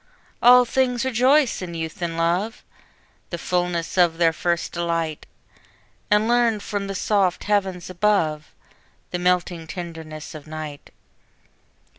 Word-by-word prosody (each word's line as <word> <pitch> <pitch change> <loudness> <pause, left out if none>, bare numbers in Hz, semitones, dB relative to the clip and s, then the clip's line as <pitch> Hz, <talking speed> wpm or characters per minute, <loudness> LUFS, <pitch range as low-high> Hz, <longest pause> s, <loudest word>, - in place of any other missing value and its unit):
All 250 +1 +8
things 250 0 0
rejoice 260 +2 +3
in 175 -2 -6
youth 160 +1 -5
and 165 -1 -2
love, 180 +7 0 0.7
The 170 - -4
fulness 175 0 -1
of 170 -2 +4
their 165 -1 +3
first 170 +1 -1
delight! 165 -2 -2 0.8
And 210 +1 +3
learn 235 -2 +3
from 200 0 -4
the 195 - -4
soft 190 -2 +1
heavens 190 -4 0
above 175 -5 0 0.6
The 180 - -2
melting 175 -2 0
tenderness 160 -2 -7
of 155 -1 -10
night. 155 -2 -7
180 Hz, 125 wpm, -23 LUFS, 165-210 Hz, 0.8 s, All